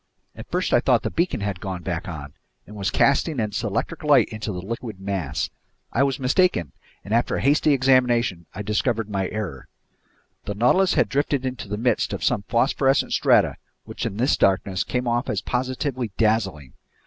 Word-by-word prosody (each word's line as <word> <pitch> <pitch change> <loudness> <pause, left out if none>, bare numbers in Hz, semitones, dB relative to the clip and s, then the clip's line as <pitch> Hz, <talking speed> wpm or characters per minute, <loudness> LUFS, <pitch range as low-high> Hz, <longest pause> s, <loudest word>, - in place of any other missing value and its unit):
At - - -10
first - - -1
I - - +6
thought - - +2
the - - -2
beacon 170 - 0
had 100 -3 -3
gone 95 -3 -5
back 85 -2 -3
on 70 -5 -7 0.3
and 105 - -12
was 100 -2 -1
casting 140 +1 +2
its 110 +3 -1
electric 115 - -3
light 150 -2 +5
into 110 -1 -5
the 90 - -5
liquid 110 +1 -6
mass. 90 -7 -3 0.4
I 125 - +1
was 140 0 +1
mistaken, 130 - +2 0.3
and 100 - -3
after 120 +1 +2
a - - -2
hasty 150 +3 +3
examination 125 - +2
I 105 - -4
discovered 110 +1 -1
my 95 -2 -1
error. 95 - -5 0.8
The 105 - -4
Nautilus 180 - +3
had 120 - +3
drifted 140 +2 0
into 130 -4 -4
the 105 +1 -3
midst 120 0 0
of - - -4
some 100 - +1
phosphorescent 135 +3 +2
strata, - - +3 0.3
which, - - -7
in 100 - -6
this 130 +5 +2
darkness, 95 -1 +1
came 125 0 -2
off 120 +2 0
as - - -1
positively 130 -1 -2
dazzling. 100 - 0
115 Hz, 185 wpm, -23 LUFS, 95-130 Hz, 0.8 s, I